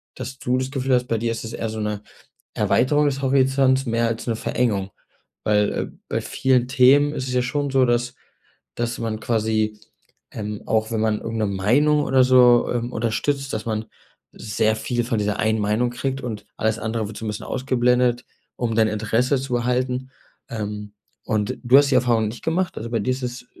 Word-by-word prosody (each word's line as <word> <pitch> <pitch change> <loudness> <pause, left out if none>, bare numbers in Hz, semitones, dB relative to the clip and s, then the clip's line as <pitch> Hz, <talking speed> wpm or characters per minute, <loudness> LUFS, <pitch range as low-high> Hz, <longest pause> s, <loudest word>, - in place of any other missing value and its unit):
dass 130 +1 -7
du 125 -2 0
das 130 0 -2
Gefühl 135 -1 -1
hast, 125 0 +2
bei 115 - 0
dir 115 +1 -1
ist 115 - -4
das 110 - -7
eher 115 - -3
so 110 0 -5
'ne 105 -1 -2 0.5
Erweiterung 145 +4 +2
des 140 -1 -1
Horizonts, 135 0 +3
mehr 115 0 +1
als 115 0 -3
'ne 115 -2 0
Verengung. 105 -6 -1 0.5
Weil, 105 -1 +2
äh, - - -2 0.2
bei - - -1
vielen 130 -2 +1
Themen 135 +3 +5
ist 130 - -3
es 125 - -3
ja 125 - +2
schon 140 +3 -2
so, 135 -1 +4
dass 120 +1 0 0.6
dass 120 0 -2
man 110 -2 -3
quasi 110 -2 0 0.5
ähm, 105 -1 -5
auch, 110 0 0
wenn 115 - -1
man 110 -1 +1
irgend 115 0 -4
'ne 110 - +1
Meinung 125 +11 +2
oder 130 -1 +4
so, 125 -2 +5
ähm, 120 0 -2
unterstützt, 135 +5 -1
dass 110 +1 -4
man 110 -1 -2 0.5
sehr 110 0 0
viel 120 +2 -2
von 115 -2 -1
dieser 105 0 -1
einen 110 0 +1
Meinung 110 +4 +1
kriegt 135 +3 -3
und 110 -4 -5
alles 110 +1 0
andere 110 -1 -2
wird 105 - -9
so 115 - -7
'n - - -2
bisschen 105 - -5
ausgeblendet, 125 -1 +1 0.3
um 115 -2 -1
dein 110 -1 +3
Interesse 110 +5 +1
zu 130 -2 -3
erhalten. 125 +1 -1 0.4
Ähm, 105 -2 -5 0.3
und 105 -1 -1
du 125 +2 +5
hast 145 -1 +3
die - - +2
Erfahrung 120 -3 +2
nicht 115 - -8
gemacht, 175 +3 -1
also 115 +1 -5
bei 115 - 0
dir 105 - -1
ist 130 +1 -5
es 125 0 -5
120 Hz, 200 wpm, -22 LUFS, 110-130 Hz, 0.6 s, Themen